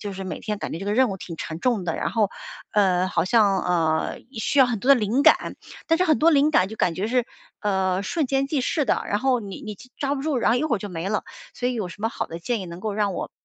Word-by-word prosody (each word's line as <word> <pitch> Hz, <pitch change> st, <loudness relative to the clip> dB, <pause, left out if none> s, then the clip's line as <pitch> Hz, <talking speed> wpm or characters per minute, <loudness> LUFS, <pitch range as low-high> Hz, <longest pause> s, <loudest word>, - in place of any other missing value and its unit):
就 205 Hz, -2 st, -5 dB
是 190 Hz, 0 st, -6 dB
每 180 Hz, -4 st, -5 dB
天 210 Hz, -2 st, -3 dB
感 -, -, -5 dB
觉 165 Hz, -, -5 dB
这 -, -, -5 dB
个 205 Hz, -, 0 dB
任 255 Hz, +1 st, +4 dB
务 195 Hz, -, -4 dB
挺 170 Hz, -3 st, -8 dB
沉 160 Hz, +1 st, -6 dB
重 230 Hz, -6 st, +1 dB
的， 165 Hz, -, -1 dB
然 -, -, -2 dB
后， 210 Hz, -2 st, +1 dB, 0.4 s
呃 185 Hz, -3 st, +3 dB
好 -, -, 0 dB
像， 200 Hz, -2 st, +3 dB
呃， 160 Hz, -3 st, 0 dB
需 250 Hz, +4 st, -1 dB
要 265 Hz, -, +8 dB
很 230 Hz, -5 st, -2 dB
多 255 Hz, -, -3 dB
的 275 Hz, -, +8 dB
灵 230 Hz, +5 st, +1 dB
感， -, -, +4 dB, 0.3 s
但 330 Hz, -, +3 dB
是 365 Hz, -, +3 dB
很 315 Hz, -4 st, +3 dB
多 330 Hz, +2 st, +5 dB
灵 290 Hz, 0 st, +4 dB
感 185 Hz, -11 st, +4 dB
就 220 Hz, -, -7 dB
感 170 Hz, -6 st, 0 dB
觉 200 Hz, +3 st, -1 dB
是， 245 Hz, 0 st, +1 dB, 0.3 s
呃， 190 Hz, -2 st, 0 dB
瞬 315 Hz, +6 st, -1 dB
间 270 Hz, +1 st, 0 dB
即 285 Hz, -2 st, 0 dB
逝 290 Hz, +3 st, 0 dB
的， -, -, +1 dB
然 205 Hz, -, -1 dB
后 260 Hz, -1 st, +2 dB
你 200 Hz, -4 st, -8 dB
你 210 Hz, -2 st, -6 dB, 0.2 s
抓 280 Hz, 0 st, -1 dB
不 270 Hz, -, -4 dB
住， 300 Hz, -3 st, 0 dB
然 235 Hz, -, +2 dB
后 245 Hz, -, +3 dB
一 310 Hz, -, 0 dB
会 275 Hz, -7 st, +1 dB
儿 -, -, -5 dB
就 205 Hz, -, -5 dB
没 180 Hz, 0 st, -4 dB
了。 210 Hz, -1 st, 0 dB, 0.3 s
所 245 Hz, -, -1 dB
以 250 Hz, -, -2 dB
有 210 Hz, -5 st, -2 dB
什 205 Hz, +4 st, -11 dB
么 225 Hz, -, +2 dB
好 -, -, -4 dB
的 165 Hz, +1 st, -8 dB
建 235 Hz, +5 st, -1 dB
议 185 Hz, -, -6 dB
能 170 Hz, +1 st, -8 dB
够 215 Hz, 0 st, -2 dB
让 205 Hz, -3 st, 0 dB
我 -, -, -4 dB
215 Hz, 315 characters per minute, -24 LUFS, 190-255 Hz, 0.4 s, 要